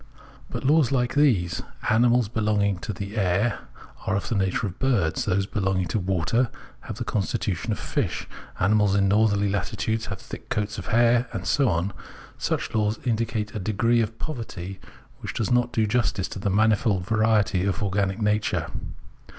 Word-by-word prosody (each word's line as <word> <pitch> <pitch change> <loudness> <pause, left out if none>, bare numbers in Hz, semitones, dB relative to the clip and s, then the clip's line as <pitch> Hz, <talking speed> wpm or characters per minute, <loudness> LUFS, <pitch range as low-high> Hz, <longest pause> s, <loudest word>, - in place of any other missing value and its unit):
But - - -5
laws 145 -2 +4
like 125 -1 +1
these: 120 - +2 0.3
animals 120 +1 +4
belonging 105 -3 +1
to 105 - -4
the 100 +1 -6
air 100 +3 +1 0.5
are 100 - +2
of 100 - -2
the - - 0
nature 95 +1 0
of 95 -3 -6
birds, 115 -12 +1
those 100 -1 +1
belonging 95 -2 0
to 110 - 0
water 95 +6 +1 0.3
have 110 - -7
the 120 - -3
constitution 100 -2 -2
of 105 - -1
fish, - - -2 0.3
animals 105 +1 +3
in 100 -1 +3
northerly 100 0 +3
latitudes 105 +3 -1
have 100 - -4
thick - - -10
coats 105 0 -2
of - - -7
hair, 120 +2 +3
and 95 0 -4
so 140 -4 +3
on 90 +3 0 0.3
— - - -18
such - - -2
laws 110 0 +1
indicate 110 -2 -1
a 105 - -3
degree 115 +4 +2
of 115 +1 -3
poverty 100 - -6 0.4
which - - -6
does 110 - -1
not 120 0 +3
do 110 -2 +2
justice 105 -4 0
to - - -6
the 100 +1 -1
manifold 105 -1 +2
variety 110 -3 +2
of 100 +2 -1
organic 100 0 0
nature. 105 0 0
105 Hz, 175 wpm, -25 LUFS, 95-115 Hz, 0.5 s, laws